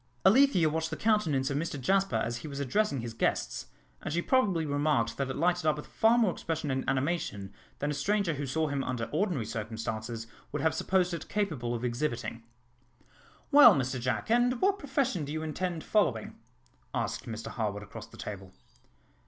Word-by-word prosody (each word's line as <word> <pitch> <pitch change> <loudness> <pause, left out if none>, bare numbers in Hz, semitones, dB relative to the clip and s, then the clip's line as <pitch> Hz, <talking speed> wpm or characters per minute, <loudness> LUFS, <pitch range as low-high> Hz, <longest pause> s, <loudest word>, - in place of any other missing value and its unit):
Alethea 215 - +6
watched 160 +1 -1
the - - -3
countenance 160 -12 +1
of 140 - 0
Mr 150 -2 -3
Jasper 195 +8 +2
as 120 +1 -1
he 120 - -8
was 140 -1 -6
addressing 140 - 0
his 115 -1 -5
guests, 115 - -1 0.3
and - - -4
she 170 - +1
probably 190 -6 +2
remarked 145 -5 +1
that 135 -1 -1
it 130 - -3
lighted 175 +1 +1
up 155 - +4
with 150 - -7
far 225 +2 +3
more 225 -6 +4
expression 160 -4 -3
and 130 0 -1
animation 130 - -1 0.2
than 145 +1 -1
a - - -1
stranger 195 +4 +1
who 145 -1 -4
saw 155 +4 0
him 140 -2 -1
under 125 -2 -2
ordinary 160 - 0
circumstances 110 +1 -4 0.3
would - - -3
have 160 - +3
supposed 185 -2 +1
it 170 - -6
capable 155 - -1
of 120 +1 -3
exhibiting. 120 -2 -2 1.1
"Well, 280 -7 +9
Mr 130 -1 -1
Jack, 120 - -2
and 245 +1 +3
what 395 +1 +2
profession 265 - 0
do 145 - -5
you 155 +1 -3
intend 165 +1 -3
following?" 130 - +1 0.6
asked - - -2
Mr 115 -1 -5
Harwood 105 -3 -3
across - - -9
the - - -15
table. 95 -3 -7
150 Hz, 185 wpm, -30 LUFS, 120-185 Hz, 1.1 s, Well